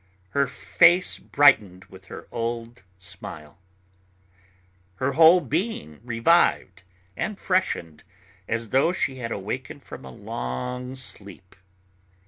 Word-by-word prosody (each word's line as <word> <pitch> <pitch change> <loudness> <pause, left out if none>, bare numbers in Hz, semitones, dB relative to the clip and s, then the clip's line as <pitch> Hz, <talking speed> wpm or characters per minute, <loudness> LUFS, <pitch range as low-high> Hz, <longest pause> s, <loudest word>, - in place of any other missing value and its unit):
Her 140 +5 +2
face 170 +8 +3
brightened 105 -10 +3
with 95 0 -16
her - - -10
old 115 0 -4 0.2
smile. 85 -3 -10 1.4
Her 130 +7 -1
whole 165 +4 +7
being 150 - -3
revived 115 - +2 0.3
and 210 - -4
freshened, 85 - -1 0.4
as 115 -1 -3
though 135 +8 +3
she 135 -7 -1
had 115 -2 -5
awakened 105 +4 -5
from - - -10
a 65 - -9
long 125 - -5
sleep. 100 -7 -7
120 Hz, 110 wpm, -24 LUFS, 95-140 Hz, 1.4 s, whole